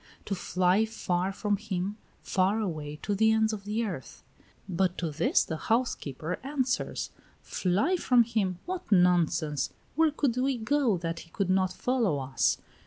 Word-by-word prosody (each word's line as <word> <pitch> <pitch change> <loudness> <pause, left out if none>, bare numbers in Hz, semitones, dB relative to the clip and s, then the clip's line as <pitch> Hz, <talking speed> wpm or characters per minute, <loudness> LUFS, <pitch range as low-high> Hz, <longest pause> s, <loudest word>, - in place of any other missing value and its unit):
To 200 - -2
fly 185 +2 +2
far 190 -4 -1
from 205 +1 -1
him, 200 -1 -3 0.3
far 195 +3 +1
away, 155 -8 -3
to 205 - 0
the 220 +2 +4
ends 220 0 +2
of 200 -2 -6
the 215 +3 -1
earth. 175 - -7 0.4
But 185 0 0
to 165 -3 -2
this 145 - +2
the 160 - -4
housekeeper 180 - -1
answers: 265 -2 -1 0.3
"Fly 205 - +1
from 250 -7 +4
him! 215 -6 -1
What 365 -7 -5
nonsense! 170 -6 +3 0.2
Where 320 +1 +4
could 280 -5 0
we 260 0 +1
go, 235 -2 +2
that 165 -1 -3
he 165 - -13
would 195 -2 +1
not 185 -1 +2
follow 230 - 0
us? 135 -1 +1
195 Hz, 160 wpm, -29 LUFS, 175-230 Hz, 0.4 s, the